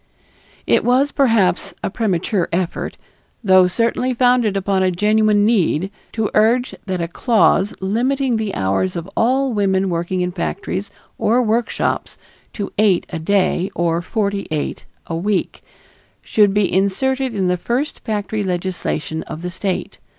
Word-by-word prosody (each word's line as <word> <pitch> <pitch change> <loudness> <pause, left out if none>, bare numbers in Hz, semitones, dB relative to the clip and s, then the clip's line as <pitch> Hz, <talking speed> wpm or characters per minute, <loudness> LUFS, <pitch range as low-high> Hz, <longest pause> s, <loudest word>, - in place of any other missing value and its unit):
It - - +3
was, 260 +4 +3
perhaps, 225 - +2
a - - -1
premature 195 -4 0
effort, 175 0 -2 0.5
though 185 -2 +6
certainly 235 +5 0
founded 245 -4 +3
upon 195 0 0
a 185 - +3
genuine 210 +2 +3
need, 190 -4 +1 0.2
to 220 -2 -1
urge 235 +4 +3
that 185 -2 -2
a - - -2
clause 210 +1 +2
limiting 245 +5 0
the 215 -3 -3
hours 95 -1 0
of 170 +1 -4
all 260 +2 +2
women 195 -2 +1
working 175 +2 -1
in 180 0 -1
factories 190 +2 -3 0.3
or 245 +3 +3
workshops 230 +1 -1 0.4
to 205 - -5
eight 200 -5 +3
a 165 - -3
day, 190 +1 +1
or 170 0 0
forty 200 +1 -2
eight 155 -1 -3 0.2
a 165 - -4
week, 195 +3 -1 0.6
should 210 -2 +3
be 205 -1 +1
inserted 255 +6 0
in 190 -2 0
the 180 - +2
first 240 - -2
factory 210 0 -3
legislation 180 -4 -3
of 160 - -7
the 180 - -3
State. 185 0 -4
200 Hz, 145 wpm, -19 LUFS, 180-225 Hz, 0.6 s, though